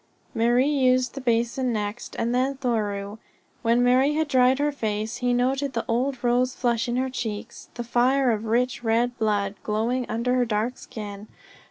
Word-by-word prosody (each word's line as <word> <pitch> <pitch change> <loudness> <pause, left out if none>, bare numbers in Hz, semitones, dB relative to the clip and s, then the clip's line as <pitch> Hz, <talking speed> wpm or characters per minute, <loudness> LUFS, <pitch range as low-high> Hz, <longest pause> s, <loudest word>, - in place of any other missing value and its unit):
Marie 240 +3 +3
used 255 -4 +2
the 275 - -6
basin 240 +1 0
next, 210 +1 -4
and 235 +1 0
then 260 +2 +1
Thoreau. 210 -5 -2 0.4
When 235 +1 +3
Marie 260 +4 +3
had 315 0 +1
dried 255 -1 +4
her 295 +1 +1
face 220 -4 -3
he 245 0 0
noted 265 +3 0
the - - -2
old 255 +2 -1
rose 250 +1 +2
flush 235 -1 0
in 240 - -1
her 260 +1 -1
cheeks, 225 -2 -6
the 240 - -4
fire 250 +2 +2
of 220 0 -2
rich, 240 +2 0
red 235 +2 +1
blood 205 -2 0
glowing 235 +4 -1
under 235 +3 0
her 255 -1 +3
dark 225 +3 -2
skin. 205 -1 -8
240 Hz, 175 wpm, -25 LUFS, 225-255 Hz, 0.4 s, dried